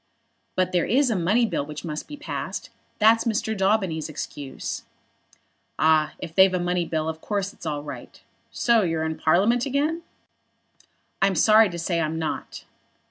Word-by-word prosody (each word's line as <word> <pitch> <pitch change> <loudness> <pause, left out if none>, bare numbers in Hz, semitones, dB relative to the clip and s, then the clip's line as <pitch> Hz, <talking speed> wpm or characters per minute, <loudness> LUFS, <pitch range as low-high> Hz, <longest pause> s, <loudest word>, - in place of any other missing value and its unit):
"But 185 0 +1
there 175 -2 +1
is 260 +1 +3
a - - +1
money 205 +7 +2
bill 215 - -1
which 150 +3 -8
must 155 -2 -5
be 295 - -8
passed. 300 - -5 0.3
That's 225 +2 +4
Mr. 220 -1 -1
Daubeny's 190 -6 0
excuse." 145 -2 -6 1.0
"Ah, 155 -1 +3
if 165 - -8
they've 190 +1 +5
a - - 0
money 175 0 0
bill 160 -1 -2
of 160 0 -4
course 200 -1 -2
it's 170 - -9
all 145 -1 -3
right. 145 - -9 0.3
So 235 -2 +3
you're 165 -4 -1
in 160 0 -2
Parliament 215 - +3
again?" 295 +5 0 1.2
"I'm 195 -1 +3
sorry 215 +2 +6
to 175 - -6
say 170 0 -1
I'm 160 0 -2
not." 160 -1 -4
180 Hz, 165 wpm, -24 LUFS, 160-220 Hz, 1.2 s, sorry